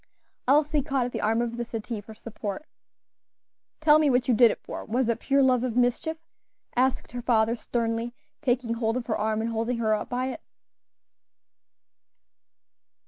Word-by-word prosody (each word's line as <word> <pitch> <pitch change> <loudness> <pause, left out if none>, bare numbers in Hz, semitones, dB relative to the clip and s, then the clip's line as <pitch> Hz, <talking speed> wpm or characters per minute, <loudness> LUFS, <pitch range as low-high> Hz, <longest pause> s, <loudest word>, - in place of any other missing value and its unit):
Elsie 295 +2 +3
caught 270 -3 0
at 245 - -4
the - - -3
arm 225 +2 +2
of 235 0 -4
the 240 - -1
settee 230 -1 -5
for 220 +2 -12
support. 215 +5 -6 1.2
"Tell 305 -1 +6
me 305 -2 +3
what 250 -1 +2
you 250 - +4
did 235 +1 +7
it - - -2
for; - - -6
was 245 +2 0
it 230 -1 0
pure 275 +1 +2
love 255 -2 +3
of 245 -3 -2
mischief?" 250 +6 +1 0.6
asked 260 +1 +1
her 245 - -5
father, 230 -1 +2
sternly, 230 0 -2 0.3
taking 245 -4 0
hold 230 0 0
of 250 - -4
her 220 - -1
arm 215 +1 0
and 230 +1 -2
holding 230 +2 -1
her 220 -2 +1
up 215 - -2
by 255 +1 -1
it. - - -6
240 Hz, 175 wpm, -26 LUFS, 225-255 Hz, 1.2 s, did